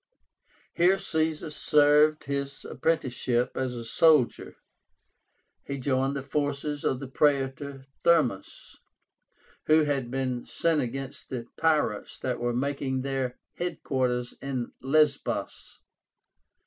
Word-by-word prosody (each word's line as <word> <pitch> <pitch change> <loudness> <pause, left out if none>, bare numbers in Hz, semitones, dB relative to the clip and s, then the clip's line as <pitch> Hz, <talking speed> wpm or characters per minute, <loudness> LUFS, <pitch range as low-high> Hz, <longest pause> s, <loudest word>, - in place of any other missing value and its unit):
Here 180 +3 +4
Caesar 160 -2 -1
served 150 +1 +4
his 140 0 -4
apprenticeship 125 -6 0
as 130 -2 -2
a 115 -1 -6
soldier. 150 +2 +3 1.1
He 140 - -5
joined 135 +1 0
the 135 - -3
forces 145 +1 -2
of 130 - 0
the 135 - -6
Praetor 135 0 0 0.2
Thermus, 150 - +1 0.9
who 155 0 +6
had 140 -4 -1
been 130 -1 -2
sent 165 -3 +1
against 135 +2 -6
the 125 -3 -4
pirates 155 -10 0
that 125 -2 -3
were 120 0 0
making 135 0 -1
their 135 -2 -2 0.2
head 175 0 -4
quarters 125 -3 -1
in 130 -3 -3
Lesbos. 140 +1 0
140 Hz, 110 wpm, -27 LUFS, 130-150 Hz, 1.1 s, who